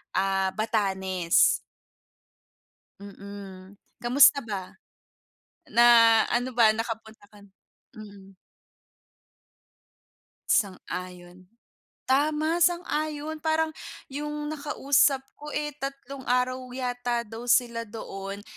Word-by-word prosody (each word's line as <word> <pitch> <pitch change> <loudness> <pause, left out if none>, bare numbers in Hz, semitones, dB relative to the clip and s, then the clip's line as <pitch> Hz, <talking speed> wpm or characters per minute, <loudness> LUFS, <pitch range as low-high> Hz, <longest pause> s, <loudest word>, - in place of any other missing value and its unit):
ah, 195 0 +1
Batanes. 190 -5 +2 1.5
Mm. 200 -1 -11 0.3
Kamusta 260 +4 +6
ba? 195 -4 -6 1.0
Na, 235 - +4 0.5
ano 245 +2 0
ba 230 -2 +6
nakapunta 220 -2 -6
ka 210 - -17
n 200 - -16 0.5
Mm. 200 -2 -13 2.1
Sang-ayon. 180 -2 -3 0.6
Tama, 305 +4 +2
sang-ayon 315 -3 -1
parang 315 +1 0 0.4
yung 295 +1 -4
nakausap 285 -2 +2 0.2
ko, 295 +1 -8
eh, 295 0 -2
tatlong 275 -1 -7
araw 250 +1 +1 0.2
yata 245 -2 -2
daw 230 +1 -9
sila 235 -1 +2
doon, 200 -2 -7
235 Hz, 85 wpm, -26 LUFS, 200-285 Hz, 2.1 s, Kamusta